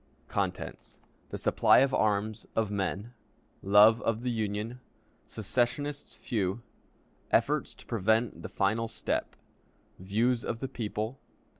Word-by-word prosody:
The - - -1 0.6
Supply - - +4
of 135 +1 +4
Arms; 110 +1 0
of 110 -2 +1
Men. 100 +3 -2 0.5
Love 105 +4 +6
of 115 +1 -1
the 125 - 0
Union. 110 +2 -3 0.5
Secessionists 125 +7 -2
few. 105 0 -2 0.7
Efforts - - +1
to - - -16
prevent 110 +1 +1
the - - -6
Final 110 +4 0
Step. 110 - -3 0.6
Views 115 +6 +1
of 115 - -3
the 135 - -3
People. 110 0 -4
110 Hz, 115 wpm, -30 LUFS, 105-120 Hz, 0.7 s, Love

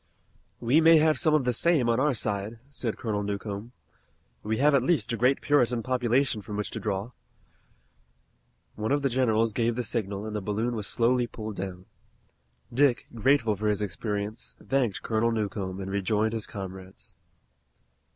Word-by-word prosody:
"We 130 +7 +3
may 165 0 +7
have 155 -3 +3
some 155 +3 +4
of 150 - +2
the 125 - +2
same 150 -1 +3
on 115 +1 +2
our 140 0 +2
side," 105 +1 -2
said 125 -5 -3
Colonel 105 -3 -2
Newcomb. 100 +2 -4 0.7
"We 110 +1 -2
have 145 +2 +4
at 140 - +5
least 130 -5 +1
a - - +1
great 125 +4 +2
Puritan 125 -5 +2
population 125 -1 +1
from 105 +1 -6
which 105 - -3
to - - -4
draw." 100 +2 -3 1.6
One 110 +3 -3
of 145 0 +1
the 135 - +2
generals 115 -3 +2
gave 115 +1 +1
the 125 - -2
signal 105 -3 -3
and 110 -1 -5
the 105 - -2
balloon 110 +5 -1
was 105 -3 -4
slowly 120 +1 +2
pulled 110 -3 -7
down. 90 -1 -6 0.9
Dick, 130 -1 +3
grateful 115 -2 +2
for 105 +2 -2
his 105 0 +1
experience, 105 +3 -4
thanked 130 -7 -1
Colonel 115 +1 +1
Newcomb 100 -4 -3
and 95 0 -5
rejoined 105 +3 0
his 110 -2 -2
comrades. 95 -1 -8
115 Hz, 170 wpm, -27 LUFS, 105-125 Hz, 1.6 s, may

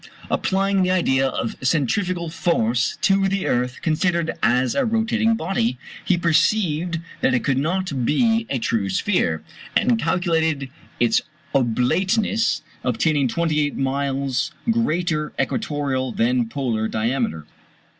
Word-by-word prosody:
Applying 195 0 +1
the 185 - +2
idea 135 -8 +2
of 115 -3 -3
centrifugal 170 - 0
force 125 -9 0
to 195 -1 +3
the 195 0 -1
earth 125 +1 -1
considered 170 +1 +1
as 125 0 +2
a - - +1
rotating 225 -1 +1
body, 160 - -1 0.3
he 185 - +2
perceived 170 0 +1 0.2
that 130 - +3
it 125 - 0
could 135 -1 +1
not 165 -3 -1
be 225 - +2
a 135 - 0
true 110 -4 -1
sphere, 95 - 0 0.3
and 240 -2 +2
calculated 160 -6 0 0.3
its 120 -1 +3 0.3
oblateness, 185 - +1 0.2
obtaining 135 +3 +1
28 150 0 0
miles 135 0 -1 0.2
greater 175 -8 0
equatorial 145 - -1
than 120 0 +1
polar 115 -5 -1
diameter. 110 - -1
150 Hz, 120 wpm, -22 LUFS, 125-185 Hz, 0.3 s, to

